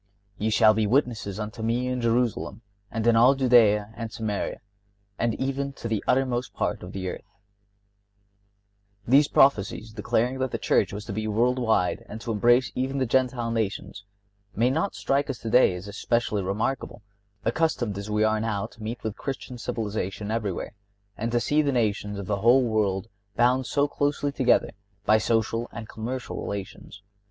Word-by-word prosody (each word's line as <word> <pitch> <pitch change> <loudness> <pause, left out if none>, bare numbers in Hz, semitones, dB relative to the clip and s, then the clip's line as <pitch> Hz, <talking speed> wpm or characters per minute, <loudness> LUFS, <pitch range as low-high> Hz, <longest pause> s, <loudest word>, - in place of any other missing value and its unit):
(59) 105 - -3
"Ye - - +3
shall 110 0 +5
be 110 -1 +1
witnesses 110 -5 0
unto 110 +1 -5
Me 115 +3 0
in 125 -1 -2
Jerusalem, 115 -2 0 0.3
and 110 +1 -3
in 120 -1 +5
all 125 +4 +6
Judea, 110 -5 +4
and 115 -1 -5
Samaria, 110 -3 -3 0.6
and 115 -2 +1
even 135 +1 -2
to 120 - -6
the 110 -3 -1
uttermost 125 -1 0
part - - -1
of 90 - -8
the 95 -1 -4
earth."(60) - - -5 1.8
These 140 +4 +6
prophecies 110 -5 +2
declaring 120 +4 0
that 130 0 0
the - - -3
Church - - +2
was 105 +1 -6
to 105 - -5
be 110 +1 -2
world 120 +4 +1
wide 110 -7 +1
and 110 - -7
to 115 - -3
embrace 120 +4 +3
even 130 +2 -2
the 130 - +1
Gentile 125 -1 +1
nations 100 -3 -3 0.5
may 120 +3 +2
not 160 +8 -1
strike 140 +1 0
us 135 - -3
today 115 -4 +3
as 90 +3 -8
especially 105 0 -1
remarkable, 105 +4 -3 0.4
accustomed 120 -4 0
as 100 +1 -6
we 105 0 +1
are 110 0 +2
now 105 -3 -1
to 115 - -13
meet 115 +3 -5
with 110 -1 -3
Christian 130 -2 -6
civilization 105 -2 -3
everywhere, 105 -5 -3 0.4
and 115 +3 -3
to 120 - +2
see 150 +5 +2
the 145 -2 +1
nations 105 -4 -1
of 100 - -5
the 100 +1 -1
world 110 -5 +3 0.3
bound 125 +2 +3
so 145 0 +2
closely 145 0 -1
together 130 -3 +2 0.3
by 110 0 +5
social 115 +1 0
and 110 -1 -7
commercial 120 +4 -5
relations. 100 0 -7
115 Hz, 170 wpm, -26 LUFS, 105-125 Hz, 1.8 s, all